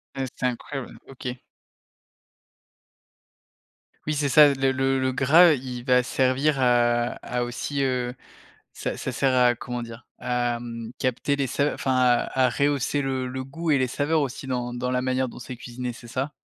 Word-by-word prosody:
Heu, 135 -1 -2
c'est - - -3
incroyable, 125 +2 -4
OK. 125 -1 -7 2.7
Oui, 155 - 0
c'est 145 -1 0
ça. 145 +2 +7
Le 135 0 +2
le 135 0 +1
le 130 0 +1
gras, 155 +6 +6
il 125 -2 -5
va 125 -1 +4
servir 135 +3 +1
à 120 -1 +3
à 125 0 -2
aussi, 135 +3 -3
heu 125 -1 -1 0.6
ça - - -4
ça - - -4
sert 135 -2 +1
à 125 -1 +5
comment 120 +1 -5
dire? 115 +1 -10
À, 120 -1 -1
mmh, 115 -1 -7
capter 130 +3 0
les 140 -1 0
sa 145 +4 0
enfin 130 -1 -1
à 125 +1 +2
à - - +5
rehausser 145 +1 0
le 130 -1 -2
le 130 +1 -5
goût 160 +4 -4
et 145 - +5
les 130 -1 +2
saveurs 150 +4 +1
aussi 135 0 -5
dans 125 -2 -2
dans 125 +1 -3
la 125 0 0
manière 130 0 0
dont - - -10
c'est 125 0 -8
cuisiné, 125 +1 -6
c'est 120 0 -13
ça? 135 +5 -3
130 Hz, 180 wpm, -25 LUFS, 125-135 Hz, 2.7 s, ça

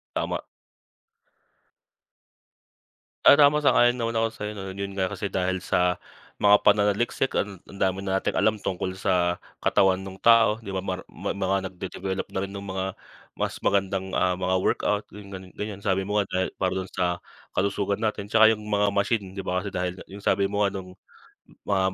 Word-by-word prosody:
Tama. - - -2 2.8
Ah, 140 - +8
tama 145 +1 +6
sang-ayon 120 -2 +5
naman 115 -1 -1
ako 115 - +3
na 115 - -15
sa'yo 105 0 -4 0.2
'yun 100 0 -4
nga 95 -1 -1
kasi 100 -2 -5
dahil 95 0 0
sa 90 0 +2 0.4
mga 105 0 +5
pananaliksik 105 +5 +2
ang 100 -1 -1
ang 100 - -13
dami 95 0 0
na 95 0 0
nating - - -2
alam 105 0 +2
tungkol 95 -1 -2
sa, 90 -2 0 0.2
katawan 95 -1 +4
nung 95 0 -9
tao 115 -2 +5
'di 110 - -11
ba? 95 - -3
Mar 95 -1 -3
ma - - -4
mga 95 -1 -1
nagde-develop 95 +1 -4
na 95 - -3
rin 100 - -7
nung 100 0 -7
mga 95 0 -2 0.4
mas - - -3
magandang, 95 -1 0
ah, 90 -1 +1
mga 90 0 0
workout 105 +2 0 0.5
ganyan, 105 -1 -5
sabi 95 -2 0
mo 105 +1 +1
nga 100 - -2
dahil 95 - +1
para 95 -1 +1
dun 95 0 -4
sa 90 -2 0 0.4
kalusugan 100 0 0
natin 105 -2 -2
tsaka 110 +1 +6
yung 105 - -4
mga 105 -1 +2
machine 100 -1 0
'di 95 - -6
ba, 90 0 -2
kasi 100 - -5
dahil 90 0 -2
nga - - -11
yung 100 +1 -11
sabi 100 0 +2
mo 100 +1 -1
nga 100 - +4
nung 95 -1 -8 0.7
mga 95 -2 +1
100 Hz, 180 wpm, -25 LUFS, 95-105 Hz, 2.8 s, Ah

